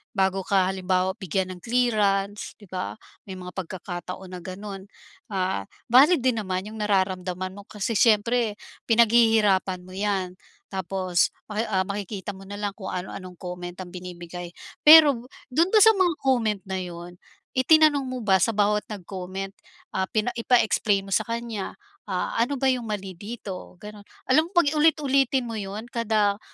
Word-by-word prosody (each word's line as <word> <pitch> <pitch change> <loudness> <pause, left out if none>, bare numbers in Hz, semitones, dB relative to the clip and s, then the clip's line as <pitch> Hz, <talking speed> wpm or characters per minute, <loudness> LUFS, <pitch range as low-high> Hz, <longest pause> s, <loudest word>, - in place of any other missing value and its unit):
bago 190 0 +2
ka 190 -1 +2
halimbawa 190 0 0
bigyan 185 0 -2
ng - - -14
clearance, 210 -4 +1
'di 205 - -15
ba, 185 +4 -5 0.2
may 195 - -10
mga 180 - -9
pagkakataon 180 0 -6
na 175 - -9
gano'n. 195 +1 -7 0.5
Ah, 185 - -1 0.2
valid 275 +7 +6
din 250 -1 +1
naman 190 -2 -3
yung 220 - -9
nararamdaman 185 -2 -1
mo 205 - -10
kasi 210 +2 -4
siyempre 220 0 +3 0.2
pinaghihirapan 225 -5 +4
mo 185 - -11
'yan, 195 -3 -1 0.3
tapos 190 -1 0 0.2
maki, 215 +1 -2
ah, 190 -4 0
makikita 200 -1 -5
mo 195 - -12
na 205 +1 -8
lang 205 -1 -3
kung 190 -4 -6
ano-anong 185 0 -7
comment 180 -1 -6
ang 185 - -6
binibigay. 175 -1 -8 0.3
Pero, 300 -3 +9 0.3
dun 330 +8 +2
ba 435 - +6
sa 445 +1 +7
mga 355 -4 +2
comment 230 -6 +1
na 190 - -3
yun, 175 0 -9 0.4
itinanong 290 +1 +5
mo 255 -1 -4
ba 200 -4 +3
sa 230 +5 +2
bawat 210 0 +1
nag-comment, 190 0 -6 0.4
ah, 190 0 0
pina 220 +3 0
ipa-explain 215 -4 +2
mo - - -9
sa 215 - +2
kanya, 230 -4 -4 0.4
ah, 180 -1 -1
ano 280 +4 -2
ba 270 - +1
yung 245 -3 -3
mali 195 -2 -4
dito? 200 -1 -8
Ganun, 210 -1 -10 0.2
alam 310 +5 +4
mo, - - -18
'pag 325 -4 +4
ulit-ulitin 275 -4 +3
mo 230 - -5
yun 200 +2 -5
kada 215 -3 +1
200 Hz, 160 wpm, -25 LUFS, 185-235 Hz, 0.5 s, Pero